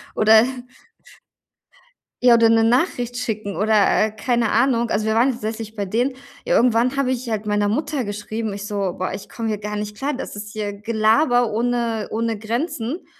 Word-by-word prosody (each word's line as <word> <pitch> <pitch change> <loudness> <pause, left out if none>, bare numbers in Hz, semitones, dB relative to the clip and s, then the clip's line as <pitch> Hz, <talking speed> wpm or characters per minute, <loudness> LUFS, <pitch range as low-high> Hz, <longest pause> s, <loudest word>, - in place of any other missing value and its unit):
oder 220 +1 +6 1.8
Ja, 245 -1 +7
oder 230 -1 +5
'ne 225 0 +4
Nachricht 245 0 +1
schicken 215 -4 -3
oder, 215 0 +3
äh, 215 - -4
keine 235 +1 0
Ahnung. 240 -3 +2
Also, 215 0 0
wir 220 - +1
waren 240 +4 +3
tatsächlich 220 -2 -6
bei 205 -2 -2
denen, 240 +7 0 0.3
ja, - - +2
irgendwann 245 +2 +3
habe 270 -2 +1
ich 250 -1 -3
halt 215 -1 -2
meiner 205 0 +1
Mutter 280 +5 -1
geschrieben. 210 +1 -4
Ich 200 0 -6
so: 200 -3 -2
„Boah, 185 - -3
ich 200 - -8
komme 225 -1 -4
hier 210 -2 -2
gar 210 0 -5
nicht 210 0 -5
klar, 275 +6 -2
das 255 - -7
ist 205 0 -7
hier 210 -1 -4
Gelaber 225 +4 +2
ohne 235 -1 -1
ohne 225 -1 -2
Grenzen“, 240 - -3
225 Hz, 180 wpm, -21 LUFS, 210-245 Hz, 1.8 s, Ja